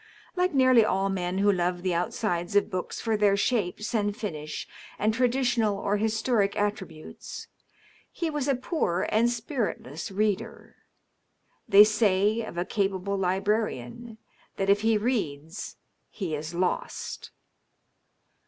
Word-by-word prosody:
Like 365 0 +1
nearly 255 -4 +5
all 195 -2 +1
men 180 -1 -2
who 205 +1 +4
love 175 -1 -1
the 185 -2 0
outsides 175 -1 -1
of 205 - +3
books 185 -1 -4
for 225 -1 0
their 205 -1 +3
shapes 210 -2 -1
and 205 -2 0
finish 155 -9 -5 0.3
and 215 +1 +1
tradi 250 +2 +1
tional 230 -5 +2
or 200 +1 0
historic 220 -1 +1
attributes, 195 -6 -4 0.7
he 335 - -3
was 295 -3 -2
a 275 - +3
poor 245 - -1
ana 225 +2 +4
spiritless 230 - -3
reader. 205 0 -2 0.9
They 200 +1 +10
say 210 0 +2
of 215 -6 -7
a 175 - 0
capable 200 -1 -1
librarian 200 - -2 0.4
that 195 0 +2
if 205 +1 +3
he 220 0 +3
reads 200 - -3 0.3
he 185 -7 -4
is 155 +3 -4
lost. 180 +1 -3
205 Hz, 135 wpm, -27 LUFS, 185-225 Hz, 0.9 s, They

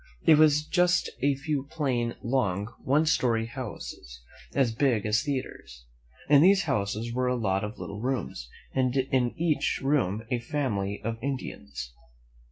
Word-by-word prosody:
It 155 -2 +7
was 150 -1 +5
just 180 +1 +2
a 140 +1 +3
few 140 0 -3
plain, 125 -7 -1
long, 115 -4 0
one 145 +4 +3
story 120 -8 +2
houses, 115 - -8 0.4
as 130 -5 +2
big 120 -4 +1
as 105 +2 +2
theatres. 130 - -5 0.4
In 145 -1 +6
these 195 +3 +5
houses 105 +3 -2
were 125 +1 0
a 125 - +1
lot 100 -5 0
of 105 +1 -5
little 105 +1 -7
rooms, 125 - -3 0.2
and 130 -1 +1
in 130 -1 0
each 165 -3 +1
room 115 -7 +1
a 125 - +1
family 115 -7 -2
of 115 +1 -3
Indians. 115 - -5
125 Hz, 150 wpm, -27 LUFS, 110-145 Hz, 0.4 s, It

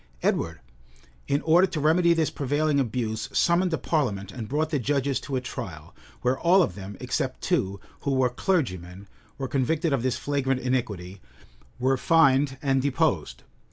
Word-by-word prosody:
Edward, 85 -3 0 0.7
in 140 +2 +1
order 175 +4 +5
to 165 - -4
remedy 165 +4 +4
this 160 -2 +1
prevailing 145 +1 0
abuse, 110 -4 -2
summoned 180 +1 +3
a 160 - +1
parliament, 105 - -1
and 115 -4 -6
brought 155 +3 0
the 145 - +1
judges 140 +1 0
to 135 - -5
a 130 - 0
trial; 125 - -7 0.3
where 125 +1 +1
all 180 +2 +5
of - - -2
them, 100 0 -8
except - - -2
two, 95 +1 0 0.2
who 140 - -1
were 130 -1 +3
clergymen, 100 - -2 0.3
were 135 -1 -3
convicted 150 +4 0
of 135 - +1
this 130 0 0
flagrant 135 -2 -1
iniquity, 105 -8 -3 0.6
were 130 +1 +1
fined, 135 -3 +3
and 135 -1 +2
deposed. 140 -1 0
135 Hz, 160 wpm, -26 LUFS, 120-155 Hz, 0.7 s, order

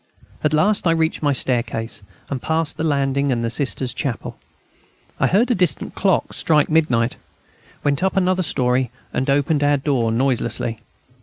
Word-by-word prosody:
At 150 - +2
last 185 +5 +2
I - - +4
reached 160 0 0
my 145 -2 +2
staircase, 120 -4 -1 0.3
and 135 -3 -4
passed 160 -1 -1
the - - -2
landing 140 -2 +1
and 115 -2 0
the 115 - 0
Sisters' 130 -1 -1
chapel. 125 -3 -4 0.8
I - - +3
heard 230 +7 +2
a - - +5
distant 180 -6 0
clock 190 -3 +1
strike 150 -2 +2
midnight, 125 -7 +2 0.7
went 145 +2 +1
up 190 +1 0
another 185 0 +2
storey, 130 -5 +1 0.2
and 130 +2 -1
opened 145 +2 +2
our 145 0 +3
door 130 -5 0
noiselessly. 120 -2 0
140 Hz, 160 wpm, -21 LUFS, 125-160 Hz, 0.8 s, a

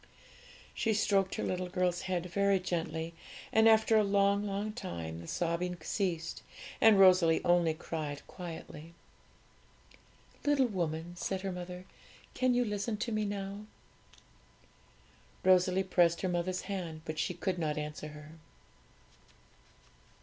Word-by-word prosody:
She 220 -2 0
stroked 195 -2 +2
her - - -3
little 180 0 -2
girl's 180 -1 0
head 180 -2 -1
very 200 +2 +2
gently; 165 -2 -3 0.4
and 220 0 +6
after 220 0 +5
a 215 - +5
long, 200 0 +2
long 205 +2 -3
time 85 - -6
the 85 - -11
sobbing 175 - -1
ceased, 170 -1 -2 0.4
and 220 -3 +7
Rosalie 185 -4 +5
only 175 -2 +3
cried 150 -3 -5
quietly. 165 -2 -9 1.5
'Little 290 -2 +3
woman,' 175 -5 -3
said 190 +1 -2
her 195 0 -3
mother, 180 0 -7 0.5
'can 255 -1 +2
you 245 0 +2
listen 210 +1 -2
to 235 - -3
me 215 -1 0
now?' 200 +1 -5 1.8
Rosalie 185 0 +4
pressed 175 -3 +3
her 185 - 0
mother's 180 +1 -1
hand, 170 -5 -5
but 155 -1 -4
she 180 - -1
could 180 +1 -2
not 150 -2 -1
answer 150 0 -5
her. 150 0 -11
180 Hz, 130 wpm, -32 LUFS, 165-200 Hz, 1.8 s, and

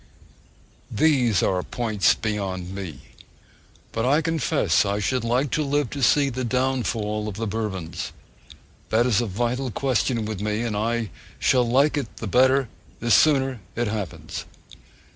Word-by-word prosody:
These 130 - +3
are 90 -1 +1
points 110 -1 +1
beyond 95 -4 -3
me. 95 -7 -7 0.9
But 115 - -2
I 145 +6 +3
confess 145 - +2
I 100 0 -1
should 110 +4 0
like 125 +4 +1
to 155 - +1
live 145 -2 0
to 140 - -5
see 140 +3 +4
the 130 +1 -3
downfall 115 -4 -1
of 105 - -5
the 115 +2 -3
Bourbons. 95 -6 -4 0.8
That 115 +2 +3
is 120 -3 +3
a 120 - -2
vital 120 +6 -1
question 120 -2 0
with 105 -2 -4
me; 105 +2 -1
and 115 -3 -2
I 115 +1 -1 0.3
shall 125 -3 +2
like 140 +5 +3
it 135 -6 -4
the - - -5
better, 130 +4 +3 0.3
the 120 0 -1
sooner 135 -2 +4 0.2
it 120 - 0
happens! 105 -6 -5
115 Hz, 150 wpm, -24 LUFS, 105-130 Hz, 0.9 s, see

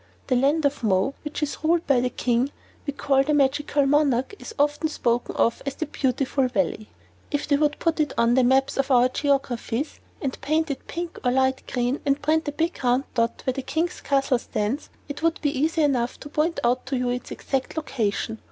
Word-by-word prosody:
The 255 - +1
land 285 +5 +2
of 285 0 0
Mo, 195 +5 +2
which 300 0 -4
is 295 - -3
ruled 330 +1 +2
by 275 -3 +4
the 250 - +1
King 245 +2 0 0.4
we 285 - -1
call 270 -1 +2
the 300 +2 +1
Magical 285 +1 +2
Monarch, 275 0 +2
is 450 - -9
often 295 +2 +1
spoken 240 -5 -1
of 230 - +1
as 275 -1 -4
the 315 - -2
"Beautiful 270 -1 0
Valley." 210 -2 -1 0.4
If 290 -1 -2
they 290 - +4
would 295 0 +2
only - - -30
put 330 -1 0
it 300 - +1
on 235 0 +4
the 260 0 +4
maps 265 +2 +3
of 275 0 0
our 250 -1 +5
geographies 270 -1 -1 0.2
and 270 -3 -4
paint 310 +1 +1
it 275 - -6
pink 340 0 -5
or 250 - +3
light 265 +1 +2
green, 245 +2 0
and 280 0 +1
print 315 +1 +1
a - - 0
big 330 +4 -2
round 250 +2 +3
dot 230 -1 0
where 260 - +1
the 270 - -3
King's 325 +6 -2
castle 275 -2 +2
stands, 220 +6 -3 0.2
it 285 0 -6
would 330 0 +1
be 290 -1 -1
easy 315 +3 +1
enough 250 -4 0
to 290 - -8
point 310 +3 0
out 250 +1 +1
to 265 0 -1
you 250 0 0
its 250 0 -4
exact 270 +3 -3
location. 225 -6 -2
275 Hz, 215 wpm, -24 LUFS, 250-295 Hz, 0.4 s, our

